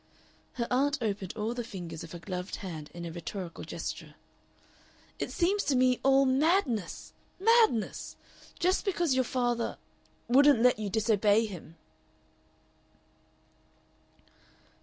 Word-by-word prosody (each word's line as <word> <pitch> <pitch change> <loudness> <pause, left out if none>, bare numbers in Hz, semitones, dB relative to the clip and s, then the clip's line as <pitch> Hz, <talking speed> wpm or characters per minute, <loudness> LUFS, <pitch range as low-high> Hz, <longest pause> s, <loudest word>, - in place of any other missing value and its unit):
Her 235 - -2
aunt 280 +4 +2
opened 200 -5 -3
all 220 +2 -1
the 245 0 -4
fingers 175 -7 -7
of 165 - -10
her - - -5
gloved 180 +1 -5
hand 160 -6 -7
in 170 0 -7
a 170 - -5
rhetorical 175 +1 -6
gesture. - - -6 1.0
"It - - -3
seems 390 +4 +1
to 280 - +1
me 255 0 +3
all 270 0 +4
madness 265 - +1 0.3
madness! 440 - +2 0.4
Just 365 +2 +1
because 345 -7 +1
your 260 0 +2
father 240 -2 -1 0.5
wouldn't 275 -1 +5
let 250 -3 +4
you 210 -2 -3
disobey 215 0 +3
him!" 175 -5 -9
235 Hz, 120 wpm, -29 LUFS, 195-275 Hz, 1.0 s, wouldn't